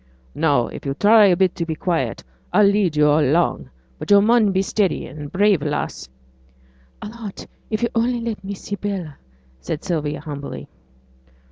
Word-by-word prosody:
'Now, 145 -7 +2
if - - -9
you'll 135 -1 -3
try 210 +5 +6
a 180 -2 +3
bit 185 -1 +2
to 170 - -1
be 160 -1 -3
quiet, 155 - -2 0.3
a'll 210 - +6
lead 200 -5 +2
yo' 150 0 +4
along; 145 - +1 0.3
but - - -7
yo' 205 0 +7
mun 220 0 +4
be 190 0 +1
a - - -1
steady 195 -1 0
and 145 +1 -9
brave 200 -3 +3
lass.' 145 - -4 0.9
'I'll 210 - -6
be 225 - -13
aught 210 -4 -8 0.2
if 215 +1 -2
yo' 235 - +2
only 240 +1 +1
let 230 -4 -5
me 200 +1 -5
see 205 - -6
Bella,' 190 -7 -5 0.4
said 105 - -5
Sylvia, 150 -5 -2
humbly. 140 - -7
180 Hz, 180 wpm, -21 LUFS, 150-205 Hz, 0.9 s, yo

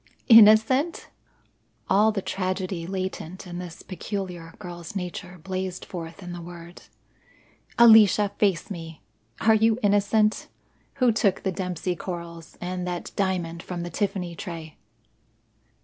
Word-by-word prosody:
"Innocent!" 225 +8 +6 0.8
All 210 +3 +4
the 200 -3 -3
tragedy 185 -2 -3
latent 185 -1 -5
in 175 -1 -7
this 175 -2 -9
peculiar 180 -3 -6
girl's 175 -2 -9
nature 180 0 -5
blazed 185 +1 -5
forth 170 +1 -8
in 175 - -7
the 175 - -7
word. 170 0 -11 1.0
"Alicia, 215 -3 +7
face 200 -2 +1
me. 165 - -8 0.4
Are 220 - +5
you 220 +1 +3
innocent? 205 +1 +2 0.5
Who 255 -3 +3
took 210 -3 +1
the 190 - 0
Dempsey 180 -1 -3
corals, 170 -2 -8
and 180 0 -4
that 175 -1 -4
diamond 175 -4 -1
from 175 -1 -5
the 175 - -6
Tiffany 185 -2 -2
tray?" 165 -3 -8
185 Hz, 125 wpm, -25 LUFS, 175-205 Hz, 1.0 s, Alicia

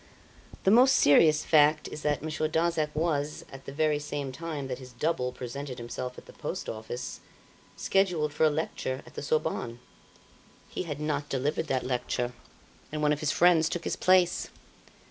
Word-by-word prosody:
"The 190 - +4
most 255 +4 +7
serious 150 +1 +5
fact 150 0 +4
is 150 - -7
that 150 -1 0
Monsieur 155 0 -1
Darzac 160 -1 +1
was, 150 -2 -1
at 135 0 -11
the - - -6
very 150 +1 +1
same 145 -2 -4
time 150 -1 -5
that 125 -1 -4
his 130 -1 -11
double 125 -1 -1
presented 125 +1 -6
himself 125 +1 -5
at - - -11
the - - -14
Post - - -5
Office, 115 +3 -5 0.6
scheduled 175 -6 +1
for 160 - 0
a - - +6
lecture 145 -4 -3
at - - -15
the - - -6
Sorbonne. 140 -5 -1 0.9
He - - -4
had 150 - -4
not 150 -1 -2
delivered 140 +4 -1
that 130 -1 0
lecture, 125 -1 -1 0.6
and 155 0 -3
one 150 0 +4
of 145 - -3
his 155 - 0
friends 170 -2 +4
took 175 - -3
his - - -1
place. 185 -1 +3
150 Hz, 175 wpm, -28 LUFS, 135-160 Hz, 0.9 s, most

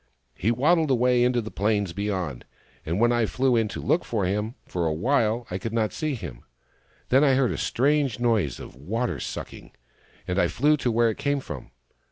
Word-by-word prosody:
" - - -47
He 105 - -1
waddled 155 +6 +3
away 125 -1 +3
into 125 -1 +2
the 110 - -8
plains 100 -3 0
beyond, 95 -9 -3 0.4
and 85 +5 -1
when 120 +1 +4
I 120 -2 +2
flew 130 +1 +1
in 115 -2 +2
to - - -6
look 170 - +1
for 105 -5 -1
him, 105 +5 -2
for 85 -2 -2
awhile 115 - +1
I 90 - -2
could 110 +3 -5
not 110 -2 0
find 155 -4 -2
him. 70 - -8 0.7
Then 135 +3 +5
I 135 -3 +4
heard 130 -2 +2
a - - -3
strange 140 -2 +1
noise 110 - +1
of - - -10
water 90 - -2
sucking, - - -7 0.5
and 90 +1 0
I - - +4
flew 150 +4 +2
to 125 -3 0
where 115 0 +3
it - - -9
came 140 -1 0
from. 75 - -8
115 Hz, 205 wpm, -25 LUFS, 100-125 Hz, 0.7 s, Then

